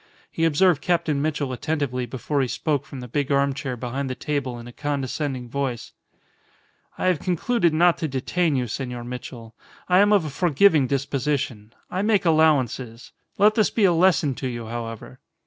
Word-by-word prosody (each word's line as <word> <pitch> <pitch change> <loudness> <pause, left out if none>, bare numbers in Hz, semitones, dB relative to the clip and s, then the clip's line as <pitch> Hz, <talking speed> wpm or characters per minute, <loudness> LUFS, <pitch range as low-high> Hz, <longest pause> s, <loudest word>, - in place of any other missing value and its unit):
He 165 - 0
observed 165 0 +3
Captain 160 -5 0
Mitchell 145 -3 -1
attentively 130 -3 -2
before 135 +4 -2
he 130 - 0
spoke 145 +2 -2
from 135 - -8
the 125 - -7
big 140 +3 -2
armchair 140 -2 0
behind 130 +3 -4
the 130 - -3
table 135 -4 -3
in 120 - -9
a - - -9
condescending 140 -2 -3
voice 130 -1 -3 1.1
"I - - -2
have 180 -4 +2
concluded 180 +2 +1
not 170 +2 +3
to 160 - -1
detain 150 +4 0
you, 125 -2 0
Senor 125 0 -5
Mitchell. 120 -2 -8 0.3
I 180 0 +4
am 205 +1 +5
of 200 -6 +4
a 150 - -4
forgiving 160 -1 +3
disposition. 135 -5 -2 0.2
I 185 - -1
make 210 -2 +2
allowances. 135 -7 +1 0.3
Let 210 +2 +5
this 215 -1 +2
be 220 - 0
a 185 -3 +5
lesson 165 -4 +3
to 130 - -3
you, 120 -2 -5
however." 115 +2 -7
140 Hz, 175 wpm, -23 LUFS, 125-165 Hz, 1.1 s, am